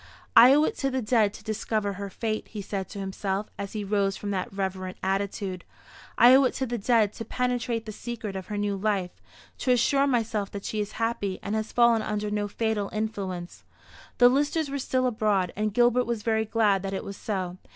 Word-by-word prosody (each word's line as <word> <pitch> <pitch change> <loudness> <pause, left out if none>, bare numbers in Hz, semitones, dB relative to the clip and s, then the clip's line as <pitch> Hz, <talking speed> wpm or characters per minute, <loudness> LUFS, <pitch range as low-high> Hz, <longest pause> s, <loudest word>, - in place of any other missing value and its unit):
"I 240 +3 +10
owe 300 - +4
it - - 0
to 275 - 0
the 260 -2 -2
dead 215 -2 +3
to - - -12
discover 215 -1 -2
her 200 +1 -6
fate," 215 +2 -3
he 210 - -6
said 190 -1 -4
to - - -9
himself, 195 +1 -3
as 200 -1 -5
he 215 -2 -3
rose 200 -1 0
from 205 - -4
that 185 -2 -2
reverent 190 -1 -4
attitude. 195 -1 -2 0.5
"I 245 +2 +8
owe 270 +1 +7
it - - 0
to 265 - -1
the 240 -1 -3
dead 215 -1 +3
to - - -6
penetrate 245 -1 -1
the 215 - -6
secret 220 -2 -6
of 190 -1 -6
her 210 - -4
new 205 -1 0
life, 195 -3 -1 0.5
to - - -2
assure 275 +3 +3
myself 225 -6 0
that 200 -1 -6
she 215 - -3
is 210 0 -3
happy, 225 -4 -2
and 200 - -3
has 220 0 -2
fallen 235 -2 +4
under 210 -1 -2
no 210 0 -1
fatal 215 -1 -1
influence." 195 -5 -4 0.5
The 245 - +7
Listers 290 +3 +1
were 280 - -2
still 255 0 0
abroad, 210 -7 +1
and 215 +1 -1
Gilbert 245 +2 +3
was 235 -3 -2
very 220 -1 +1
glad 210 -3 +2
that 195 0 -3
it - - -4
was 200 - -7
so. 185 -4 -3
215 Hz, 215 wpm, -27 LUFS, 200-235 Hz, 0.5 s, I